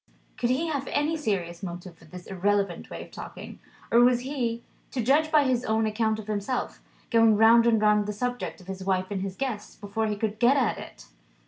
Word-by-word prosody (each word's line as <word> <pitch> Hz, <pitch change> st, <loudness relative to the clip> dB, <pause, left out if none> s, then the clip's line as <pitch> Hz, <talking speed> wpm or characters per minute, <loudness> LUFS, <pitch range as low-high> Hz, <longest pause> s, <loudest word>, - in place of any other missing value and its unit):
Could 240 Hz, -, -1 dB
he 265 Hz, +6 st, +1 dB
have 280 Hz, -3 st, -2 dB
any 300 Hz, +3 st, 0 dB
serious 185 Hz, -, -2 dB
motive 175 Hz, -1 st, -7 dB
for -, -, -19 dB
this 180 Hz, +3 st, -11 dB
irrelevant 195 Hz, -1 st, -1 dB
way -, -, -7 dB
of -, -, -16 dB
talking? -, -, -9 dB, 0.3 s
Or 235 Hz, -, +6 dB
was 245 Hz, 0 st, +5 dB
he, 245 Hz, -4 st, -3 dB, 0.3 s
to 250 Hz, -, -2 dB
judge 300 Hz, +6 st, +3 dB
by 300 Hz, -2 st, +5 dB
his 255 Hz, -2 st, +1 dB
own 220 Hz, -1 st, +1 dB
account 220 Hz, 0 st, 0 dB
of 220 Hz, -, -8 dB
himself, 215 Hz, +4 st, -3 dB, 0.3 s
going 225 Hz, -2 st, +5 dB
round 230 Hz, +2 st, +6 dB
and 225 Hz, -2 st, +4 dB
round 210 Hz, -1 st, +3 dB
the -, -, -1 dB
subject 245 Hz, +3 st, -3 dB
of 185 Hz, -, -15 dB
his 190 Hz, 0 st, -6 dB
wife 185 Hz, 0 st, -1 dB
and 195 Hz, -2 st, -2 dB
his 190 Hz, -1 st, -4 dB
guest, 220 Hz, -5 st, -5 dB
before 215 Hz, +1 st, -2 dB
he 210 Hz, -, -1 dB
could 215 Hz, 0 st, -3 dB
get 245 Hz, +4 st, +5 dB
at 255 Hz, -5 st, +1 dB
it? -, -, -11 dB
220 Hz, 215 wpm, -26 LUFS, 200-245 Hz, 0.3 s, Or